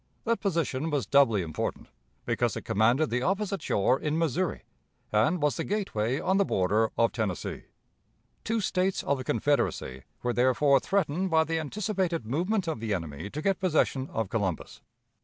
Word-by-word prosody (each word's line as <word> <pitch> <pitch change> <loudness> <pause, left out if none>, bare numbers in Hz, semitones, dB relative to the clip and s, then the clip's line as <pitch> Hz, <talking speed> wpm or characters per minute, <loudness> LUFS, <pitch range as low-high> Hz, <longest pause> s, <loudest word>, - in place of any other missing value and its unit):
That 230 0 0
position 165 -6 -1
was 145 -7 0
doubly 115 -6 +4
important, 80 -2 -4 0.4
because - - 0
it - - -6
commanded 120 +9 +2
the 125 +1 0
opposite 195 +4 -1
shore 125 +6 +2
in 150 +1 -1
Missouri, 165 +2 -1 0.5
and 155 +12 +2
was 150 -2 +1
the - - -1
gateway 135 - -1
on 190 - +1
the 200 - +4
border 105 - +1
of 115 0 +3
Tennessee. 105 -6 -3 0.8
Two 225 0 0
States 185 0 0
of 140 -1 0
the - - -4
Confederacy 115 - 0 0.2
were 120 0 0
therefore 130 +3 +4
threatened 185 +4 0
by 160 -1 +4
the 160 0 -1
anticipated 185 - -2
movement 180 - 0
of 160 -8 -2
the 110 -2 -1
enemy 80 +1 -6
to 150 +7 -6
get 195 -1 +1
possession 155 -7 +1
of 110 -2 -2
Columbus. 100 -7 -3
145 Hz, 165 wpm, -28 LUFS, 115-185 Hz, 0.8 s, doubly